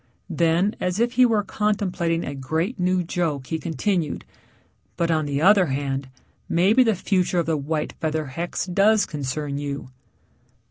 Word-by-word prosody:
Then 170 +5 +2
as 180 +2 -1
if 240 +1 +2
he 250 0 +5
were 220 -3 +1
contemplating 190 -5 -1
a 140 - -4
great 160 - -2
new 180 0 +1
joke 165 -6 -2
he 160 +4 -3
continued. 170 0 -2 0.7
"But 170 -1 +1
on 155 -2 +1
the 140 +1 -1
other 195 -1 +6
hand, 135 -1 -2 0.4
maybe 195 +9 +4
the 225 -4 +2
future 185 -1 0
of 170 - +2
the 160 0 0
white 150 +1 -2
feather 155 -1 -1
hex 165 +6 -4
does 200 +4 +3
concern 145 0 -4
you." 140 -2 -5
170 Hz, 155 wpm, -23 LUFS, 145-195 Hz, 0.7 s, other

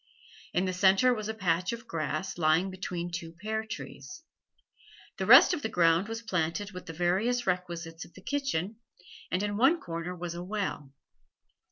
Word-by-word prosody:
In 180 +2 +1
the 185 - -1
centre 195 +7 +4
was 215 -2 -4
a - - -1
patch 180 -1 0
of 235 +2 -7
grass, 165 +2 -3
lying 165 +4 +3
between 180 -2 -4
two 170 -1 -5
pear 215 +5 -3
trees; 320 +9 -8 0.9
the - - -2
rest - - +9
of 305 - -2
the 220 - -2
ground 170 -1 +3
was 225 +1 -5
planted 185 +1 -1
with 180 -2 -9
the - - -5
various 195 +9 +1
requisites 175 -2 -3
of - - -16
the - - -12
kitchen, 260 - -2 0.5
and 185 +2 0
in 205 0 -1
one 275 +9 +4
corner 170 +1 -5
was 175 -1 -5
a 170 - -6
well. 190 -8 -3
185 Hz, 175 wpm, -29 LUFS, 170-220 Hz, 0.9 s, rest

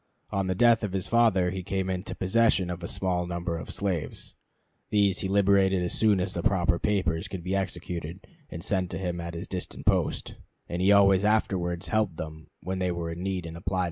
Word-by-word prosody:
On 95 -1 0
the 95 - 0
death 115 +2 +5
of 100 -3 -2
his 95 -2 0
father 110 -7 +3
he 95 0 -4
came 95 0 -2
into 95 +2 -3
possession 95 -2 +2
of 90 0 -6
a 85 - -4
small 90 -2 -1
number 85 -1 -3
of - - -8
slaves. 95 -6 -3 0.6
These 100 -2 +2
he 95 - -1
liberated 95 -1 +3
as 90 - -2
soon 105 -3 +3
as 90 +1 -1
the 85 - -2
proper 90 -1 +2
papers 95 -3 0
could 95 -3 -6
be 95 +2 -1
executed 90 -2 -4 0.2
and 85 - -7
sent 95 -3 0
to - - -4
him 90 -2 -3
at 85 0 -6
his 85 - -6
distant 90 -2 -6
post; - - 0 0.3
and 85 +1 -3
he 95 +2 +5
always 100 -1 +6
afterwards 95 -4 0
helped 105 -7 0
them 80 0 -7 0.2
when 95 0 -3
they 90 -1 0
were 85 -1 -3
in 85 +1 -6
need 95 -2 -2
and 80 0 -7
applied 90 +2 -4
to - - +1
him. - - +1
95 Hz, 220 wpm, -27 LUFS, 85-100 Hz, 0.6 s, always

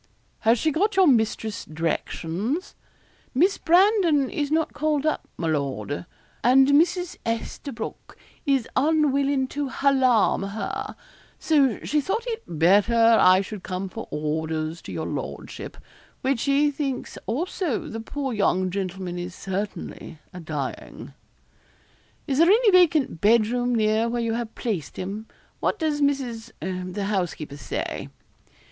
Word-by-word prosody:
'Has 225 +2 +3
she 315 +6 +1
got 395 +7 +1
your 380 -1 +6
mistress's 220 - +1
directions?' 165 - -3 0.6
'Miss 365 +9 +3
Brandon 345 - +4
is 290 -2 -1
not 320 +1 0
called 305 -1 0
up, 310 - -1
my 165 - -2
lord, 145 +1 -2 0.4
and 265 +3 +6
Mrs. 345 +4 +2
Esterbroke 230 +1 -5 0.3
is 275 -6 +1
unwillin' 280 -2 +2
to 285 -1 -3
halarm 260 -5 +3
her; 215 - -4 0.4
so 275 -7 +3
she 300 0 +1
thought 425 - -2
it 450 - -3
better 190 +8 +3 0.3
I 185 +1 +6
should 200 0 -7
come 185 +1 -4
for 225 +4 -7
orders 155 +2 -2
to - - -9
your - - -3
lordship; - - -6 0.4
which 265 -2 +1
she 285 +3 +2
thinks 275 -3 -4
also 310 - -2
the 225 - -5
poor 270 +3 -4
young 185 -3 +1
gentleman 185 -2 -4
is 180 +1 -6
certainly 195 -3 -5 0.2
a 180 - -7
dying.' 150 -5 -6 1.1
'Is 275 0 -1
there 335 - +6
any 435 +1 +5
vacant 320 - +3
bed 220 +1 +5
room 245 +2 0
near 220 +1 +2
where 240 +1 -1
you 230 -1 0
have 230 -1 -4
placed 200 - -3
him? 205 +4 -5 0.3
What - - 0
does 310 -4 -1
Mrs. 255 -5 -1 0.4
the 200 +2 -3
housekeeper, 175 -8 -2
say?' 125 - -4
235 Hz, 135 wpm, -24 LUFS, 190-290 Hz, 1.1 s, your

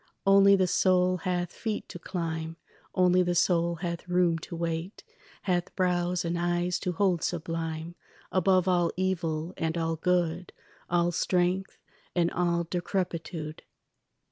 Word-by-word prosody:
Only 195 0 +7
the 190 -1 +3
soul 185 0 +3
hath 180 -1 -2
feet 220 -2 -4
to 175 - -8
climb, 165 -2 -4 0.4
Only 180 0 +4
the 175 -1 0
soul 170 -1 +2
hath 170 0 -5
room 175 -2 +2
to 170 - -8
wait, 165 +3 -3 0.4
Hath 180 -3 -1
brows 180 -1 +1
and 170 +1 -1
eyes 175 +1 0
to 180 -2 -2
hold 180 -2 +1
sublime 165 -1 -3 0.4
Above 185 0 +3
all 175 -2 +3
evil 170 -3 -1
and 160 +1 -1
all 165 -1 -1
good, 175 0 0 0.4
All 175 0 +2
strength 180 +2 0 0.4
and 170 -1 +2
all 170 -1 +1
decrepitude. 170 -2 -3
175 Hz, 135 wpm, -28 LUFS, 170-180 Hz, 0.4 s, Only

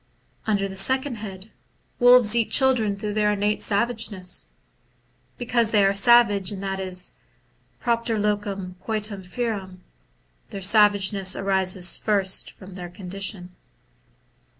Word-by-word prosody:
Under 200 -2 0
the 190 - -9
second 260 +5 +1
head, 200 -1 -9 0.5
wolves 245 -3 +6
eat 230 -2 +1
children 250 -7 +2
through 210 0 -4
their 210 0 +1
innate 205 +1 -1
savageness, 205 -4 -1 0.9
because 235 -2 +1
they 210 -3 +3
are 195 - +3
savage, 205 -2 +4
and 200 -1 -6
that 195 0 -3
is 185 -1 -2 0.7
(propter 235 -1 -1
locum 205 -3 -3
coitum 215 -2 -3
ferum). 195 -2 -4 0.7
Their 195 - -7
savage 205 0 +4
ness 190 -2 0
arises 190 -1 0
first 195 -3 0
from 190 0 -14
their 180 -1 -8
condition. 185 0 -4
205 Hz, 125 wpm, -23 LUFS, 190-220 Hz, 0.9 s, wolves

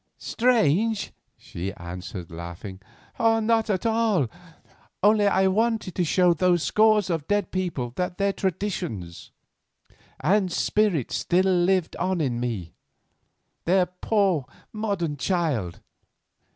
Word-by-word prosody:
"Strange?" 225 - +1 0.2
she 90 +3 -6
answered, 90 0 -8
laughing. 85 +4 -8 0.4
"Not 225 0 +2
at 195 +1 -1
all; 220 - +2 0.7
only 210 0 +5
I 190 -1 +3
wanted 220 -1 0
to 180 - 0
show 175 +1 +3
those 175 0 +2
scores 215 -3 +3
of 160 -3 -2
dead 205 -3 0
people 170 -10 -2
that 180 0 -2
their 200 0 +1
traditions 175 - -4 0.9
and 195 -1 +2
spirit 195 - +1
still 175 +11 +1
lived 180 -1 +1
on 185 -1 -1
in 125 -6 -1
me, 110 -9 -4 0.9
their 180 +1 +3
poor 180 - 0 0.3
modern 200 -8 -2
child. 140 - -1
180 Hz, 110 wpm, -25 LUFS, 140-205 Hz, 0.9 s, only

